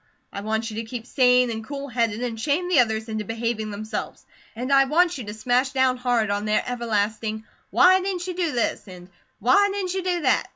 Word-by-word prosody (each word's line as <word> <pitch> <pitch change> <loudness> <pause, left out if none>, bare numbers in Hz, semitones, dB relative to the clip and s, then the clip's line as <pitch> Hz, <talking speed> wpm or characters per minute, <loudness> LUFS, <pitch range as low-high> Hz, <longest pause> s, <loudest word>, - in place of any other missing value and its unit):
I 200 - -5
want 220 +2 -2
you 215 - -7
to 225 - -2
keep 230 0 -7
sane 250 -2 +3
and 220 0 -5
cool 280 +3 -6
headed 230 -2 -1
and 230 -2 -4
shame 310 +7 0
the 355 - +4
others 220 -2 +1
into 215 -1 -3
behaving 225 0 -3
themselves. 210 +1 -6 0.3
And 255 +4 -2
I 275 0 +6
want 335 +2 +2
you 240 - -6
to 205 - -6
smash 250 +4 +1
down 260 -1 +2
hard 240 -4 0
on 205 +1 -1
their 215 0 +1
everlasting, 220 -2 -2 0.3
'why 370 +1 +5
didn't 365 -2 -3
you 365 - -4
do 345 -3 0
this?' 235 -3 -1
and 180 -1 -12 0.3
'why 405 - +4
didn't 385 -2 -3
you 380 - -1
do 355 -1 -1
that?' 255 -4 +2
245 Hz, 215 wpm, -24 LUFS, 220-285 Hz, 0.3 s, I